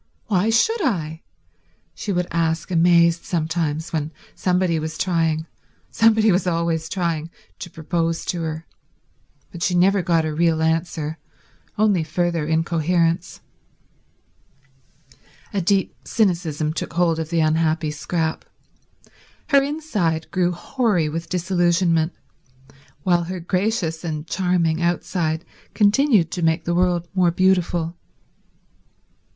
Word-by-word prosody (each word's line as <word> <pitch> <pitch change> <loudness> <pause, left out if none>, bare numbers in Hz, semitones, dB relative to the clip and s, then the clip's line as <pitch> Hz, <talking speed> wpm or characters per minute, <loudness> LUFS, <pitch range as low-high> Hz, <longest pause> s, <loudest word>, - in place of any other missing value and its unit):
Why 205 0 +1
should 425 - +2
I?" 160 - -2 0.7
she 205 - -4
would 180 -1 0
ask 165 0 -1
amazed 170 0 +4
sometimes 160 -1 -2
when 155 -1 -2 0.2
somebody 180 -3 +1
was 155 0 -5
trying—somebody 180 +6 +1
was 185 +1 +1
always 165 -1 -1
trying—to 170 0 -4
propose 165 +1 -2
to 175 - -2
her. 160 0 -4 0.9
But 175 - -9
she 180 -1 +1
never 190 +2 +4
got 170 -3 +1
a 155 - -2
real 160 0 +2
answer, 160 -1 -1 0.6
only 205 -5 +3
further 165 0 -1
incoherence. 165 +1 0 2.1
A 200 - 0
deep 190 +2 +1
cynicism 170 -7 0
took 165 - -5
hold 165 -1 +2
of 160 -1 -4
the 165 -1 +1
unhappy 155 0 +1
Scrap. 160 +2 -2 1.1
Her 280 -2 +6
inside 235 - -2
grew 180 -1 +1
hoary 180 - 0
with 165 +2 -5
disillusionment, 175 -2 +1 0.9
while 175 -2 +2
her 185 +1 -5
gracious 180 -2 -1
and 155 -2 -4
charming 175 -2 0
outside 170 -1 -1 0.3
continued 210 - +3
to 180 - -3
make 160 0 +1
the 170 - 0
world 175 -1 +1
more 185 -2 +3
beautiful. 175 -2 +1
170 Hz, 115 wpm, -22 LUFS, 160-185 Hz, 2.1 s, Her